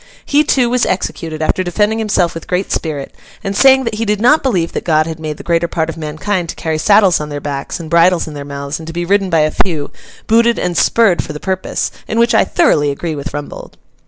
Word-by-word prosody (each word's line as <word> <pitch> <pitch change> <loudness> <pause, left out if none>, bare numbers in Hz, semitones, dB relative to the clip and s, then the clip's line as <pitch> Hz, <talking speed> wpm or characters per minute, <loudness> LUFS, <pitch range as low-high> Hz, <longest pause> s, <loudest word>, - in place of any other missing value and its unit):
He, 290 +1 +3
too, 260 -4 +2
was 245 0 +1
executed, 160 -4 -3
after 185 +4 0
defending 210 +5 0
himself 200 -6 +1
with 165 - -8
great 180 +2 -2
spirit, 150 -4 -3 0.3
and 195 0 -3
saying 265 +3 +5
that 230 - -3
he 215 +2 -2
did 210 -2 0
not 250 +8 +4
believe 180 -11 0
that - - -4
God 155 -2 +2
had 160 0 -6
made 155 -2 -5
the - - -10
greater 170 0 +1
part 165 -1 -2
of - - -5
mankind 165 +4 -3
to - - -5
carry 160 -1 -2
saddles 200 0 +4
on 150 0 -5
their 145 -1 -4
backs 140 +1 -5
and 165 - -7
bridles 170 +1 +3
in 155 - -7
their 145 -1 -6
mouths, 140 +1 -5
and 160 - -10
to 165 - -6
be 175 +1 -2
ridden 195 +1 +1
by 165 -3 +3
a 155 0 +1
few, 155 -6 -1 0.3
booted 230 +1 +3
and 175 -1 -2
spurred 210 -4 +3
for - - -7
the 150 - -7
purpose—in 190 +4 -3
which 235 +1 +3
I 220 - +5
thoroughly 145 -1 +2
agree 160 +4 -3
with 145 +1 -5
Rumbold. 145 -1 -8
170 Hz, 240 wpm, -15 LUFS, 155-210 Hz, 0.3 s, saying